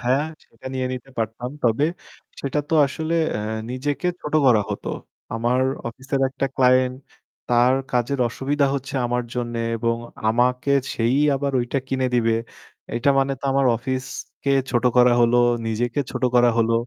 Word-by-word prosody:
হ্যাঁ 130 Hz, +3 st, +2 dB, 0.2 s
সেটা 115 Hz, +2 st, -15 dB
নিয়ে 130 Hz, -1 st, -1 dB
নিতে 130 Hz, +1 st, -7 dB
পারতাম। 115 Hz, +2 st, -3 dB
তবে 120 Hz, +4 st, +2 dB, 0.6 s
সেটা 140 Hz, +1 st, -2 dB
তো -, -, +1 dB
আসলে 160 Hz, +4 st, -3 dB, 0.2 s
আ -, -, -3 dB, 0.3 s
নিজেকে 140 Hz, +5 st, -2 dB
ছোট 150 Hz, -, -5 dB
করা 120 Hz, -4 st, +6 dB
হতো। 105 Hz, -, -4 dB, 0.5 s
আমার 120 Hz, +3 st, +1 dB, 0.3 s
অফিসের 135 Hz, +3 st, -4 dB
একটা 135 Hz, +1 st, -2 dB
ক্লায়েন্ট 130 Hz, 0 st, +3 dB, 0.5 s
তার 120 Hz, +1 st, +4 dB, 0.2 s
কাজের 125 Hz, +3 st, 0 dB
অসুবিধা 140 Hz, +4 st, 0 dB
হচ্ছে 135 Hz, 0 st, -5 dB
আমার 125 Hz, +1 st, 0 dB
জন্যে 120 Hz, -1 st, -3 dB, 0.2 s
এবং 115 Hz, 0 st, 0 dB, 0.3 s
আমাকে 125 Hz, +4 st, +1 dB, 0.2 s
সেই 115 Hz, +2 st, +1 dB, 0.2 s
আবার 140 Hz, +1 st, -1 dB
ঐটা 120 Hz, +3 st, -1 dB
কিনে 130 Hz, -1 st, 0 dB
দিবে। 115 Hz, -2 st, +3 dB, 0.6 s
এইটা 120 Hz, +4 st, +2 dB
মানে 135 Hz, 0 st, +2 dB
তো -, -, -10 dB
আমার 135 Hz, 0 st, +3 dB
অফিসকে 130 Hz, +3 st, -4 dB, 0.2 s
ছোট 120 Hz, -2 st, +1 dB
করা 125 Hz, 0 st, +6 dB
হলো, 120 Hz, 0 st, +4 dB, 0.3 s
নিজেকে 115 Hz, +4 st, -1 dB
ছোট -, -, -5 dB
করা 120 Hz, 0 st, +6 dB
হলো। 115 Hz, 0 st, +2 dB
125 Hz, 155 wpm, -22 LUFS, 120-135 Hz, 0.6 s, করা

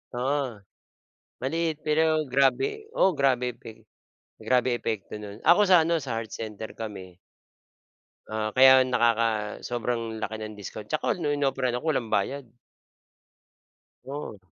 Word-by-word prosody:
Oo, 135 Hz, +3 st, 0 dB, 1.0 s
maliit 160 Hz, +4 st, -1 dB
pero 155 Hz, +1 st, +3 dB, 0.3 s
grabe 140 Hz, -, +3 dB, 0.3 s
oo, 190 Hz, -, +5 dB
grabe 130 Hz, -2 st, +2 dB
epe 115 Hz, -1 st, -11 dB, 0.8 s
grabe 125 Hz, 0 st, +3 dB
epekto 110 Hz, -3 st, -4 dB
no'n. 105 Hz, +1 st, -10 dB
Ako 175 Hz, -, +6 dB
sa 180 Hz, -3 st, +6 dB
ano, 165 Hz, +1 st, +1 dB
sa 130 Hz, -6 st, -4 dB
Heart 115 Hz, -1 st, -5 dB
Center 110 Hz, 0 st, -6 dB
kami. 95 Hz, -5 st, -8 dB, 1.1 s
Oo, 110 Hz, 0 st, -2 dB
kaya 130 Hz, +1 st, +8 dB
nakaka 115 Hz, -4 st, +1 dB
sobrang 115 Hz, -1 st, -2 dB
laki 110 Hz, +1 st, -3 dB
ng 110 Hz, -1 st, -7 dB
discount, 105 Hz, +1 st, -8 dB
tsaka -, -, 0 dB
nung 145 Hz, -2 st, 0 dB
inoperahan 135 Hz, -3 st, 0 dB
ako 125 Hz, -, -8 dB
walang 120 Hz, -5 st, -2 dB
bayad. 125 Hz, +7 st, 0 dB, 1.6 s
'Yon. 135 Hz, -6 st, -6 dB
120 Hz, 130 wpm, -26 LUFS, 110-140 Hz, 1.6 s, kaya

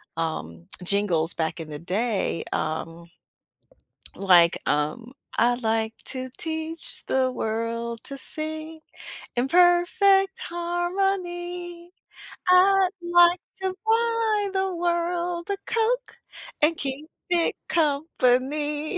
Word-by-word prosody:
um, 85 Hz, -, -4 dB, 0.2 s
jingles 180 Hz, -4 st, +1 dB
back 160 Hz, +1 st, -2 dB
in 160 Hz, -, -7 dB
the 150 Hz, -1 st, -6 dB
day, 195 Hz, 0 st, -1 dB
um, 165 Hz, +2 st, -3 dB, 1.1 s
like, 175 Hz, -3 st, +5 dB
um, 225 Hz, -, -1 dB, 0.2 s
"I 240 Hz, +1 st, +4 dB
like 225 Hz, -2 st, 0 dB
to 260 Hz, 0 st, -3 dB
teach 320 Hz, 0 st, -3 dB
the 260 Hz, -1 st, +2 dB
world 230 Hz, 0 st, -3 dB
to 275 Hz, -, -6 dB
sing 315 Hz, +3 st, -5 dB, 0.6 s
in 250 Hz, +2 st, +1 dB
perfect 360 Hz, +3 st, +4 dB
harmony. 350 Hz, 0 st, -3 dB, 0.6 s
I 375 Hz, +1 st, +6 dB
like 345 Hz, 0 st, +5 dB, 0.2 s
to 380 Hz, -1 st, -1 dB
buy 450 Hz, -2 st, +2 dB
the 380 Hz, -1 st, 0 dB
world 345 Hz, +1 st, -1 dB
a 400 Hz, -, 0 dB
Coke 480 Hz, +2 st, 0 dB, 0.4 s
and 315 Hz, +2 st, +3 dB
keep 280 Hz, +3 st, -5 dB, 0.2 s
it 345 Hz, -2 st, +1 dB
company." 295 Hz, 0 st, +1 dB
315 Hz, 100 wpm, -25 LUFS, 230-350 Hz, 1.1 s, I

